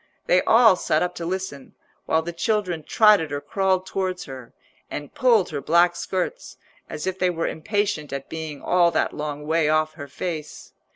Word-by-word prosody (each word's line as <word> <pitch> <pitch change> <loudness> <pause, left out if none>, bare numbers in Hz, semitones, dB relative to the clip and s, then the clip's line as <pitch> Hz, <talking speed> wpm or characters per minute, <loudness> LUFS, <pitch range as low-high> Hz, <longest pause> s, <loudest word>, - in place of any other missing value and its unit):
They 180 - +4
all 225 -3 +6
sat 155 -2 +1
up 180 - -2
to 170 - -5
listen, 185 -7 -5 0.3
while 160 0 +2
the 170 +1 -5
children 180 -1 -1
trotted 205 -5 +4
or 145 - -2
crawled 190 +5 0
towards 185 -1 -3
her, 130 -4 -10 0.4
and 145 -1 -7
pulled 230 -8 +3
her 145 -2 -3
black 175 +3 +3
skirts, 190 - -4 0.3
as - - -5
if 190 0 -3
they 185 - +2
were 165 -2 -2
impatient 200 -2 -2
at 140 0 -5
being 160 -3 -6
all 175 -1 +4
that - - 0
long 150 -1 -5
way 160 0 +2
off 155 0 +1
her 145 - -9
face. 160 -1 -6
170 Hz, 180 wpm, -23 LUFS, 155-190 Hz, 0.4 s, all